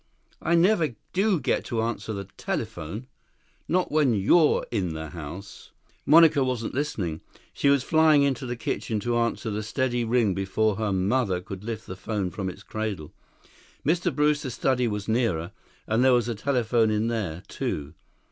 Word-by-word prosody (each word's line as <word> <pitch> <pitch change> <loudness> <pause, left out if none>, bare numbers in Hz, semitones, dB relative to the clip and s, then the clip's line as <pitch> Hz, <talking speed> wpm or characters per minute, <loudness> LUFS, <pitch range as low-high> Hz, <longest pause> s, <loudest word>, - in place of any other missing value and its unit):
"I 170 - +2
never 170 - +3 0.2
do 195 -1 +2
get - - 0
to 115 -2 -1
answer 115 -1 -3
the 100 -2 -4
telephone. 100 +11 -4 0.6
Not 180 +1 +1
when 145 -6 +3
you're 150 - +4
in 95 -8 -1
the 80 0 -5
house." 85 +5 -9 0.2
6 - - -35
Monica 160 -3 +7
wasn't 125 -3 -2
listening. 100 - -2 0.3
She 140 - +2
was 140 -2 +3
flying 155 -1 +4
into 135 -2 0
the 120 - -3
kitchen 110 -1 -2
to 120 +1 0
answer 115 -1 -1
the 105 +1 -2
steady 120 +2 -1
ring 115 -3 +2
before 95 +2 0
her 110 -2 -1
mother 95 +1 +1
could 95 +2 -8
lift 110 0 -5
the 90 - -7
phone 100 -1 -3
from 95 -2 -3
its 95 +3 -10
cradle. 105 -9 -4 0.7
Mr. 175 +4 +2
Brewster's 150 -2 +1
study 125 -2 +1
was 105 -2 -3
nearer, 110 -7 0 0.3
and 110 +3 +1
there 130 -1 +5
was 120 -1 +2
a 120 - -1
telephone 115 -1 +1
in 105 +1 +1
there, 105 -8 -3
too. 75 0 -4
115 Hz, 170 wpm, -26 LUFS, 100-135 Hz, 0.7 s, Monica